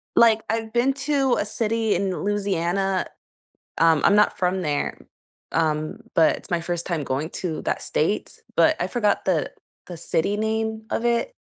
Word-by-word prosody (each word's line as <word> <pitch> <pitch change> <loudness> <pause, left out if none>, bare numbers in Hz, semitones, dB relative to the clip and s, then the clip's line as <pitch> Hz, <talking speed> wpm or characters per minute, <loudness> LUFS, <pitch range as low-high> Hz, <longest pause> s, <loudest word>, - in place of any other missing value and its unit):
Like, 225 -1 +5
I've 225 0 -2
been 245 +3 +2 0.2
to 270 -3 +3
a - - 0
city 225 0 0
in 190 +1 0
Louisiana, 195 -2 0 0.7
um, 165 -2 +4
I'm 200 - +5
not 210 - +3
from 185 +1 0
there, 145 -3 -1 0.6
um, 155 -1 0 0.2
but 160 -1 +4
it's - - -14
my 170 -1 0
first 175 0 -3
time 165 -5 -2
going 140 +5 -2
to 165 -4 -2
that - - -2
state, - - -1 0.2
but - - +4
I - - +1
forgot 210 -5 0
the 170 -6 0 0.3
the 175 - -8
city 170 +4 0
name 220 0 -2
of 230 - -1
it. 235 - +1
195 Hz, 165 wpm, -23 LUFS, 165-220 Hz, 0.7 s, Like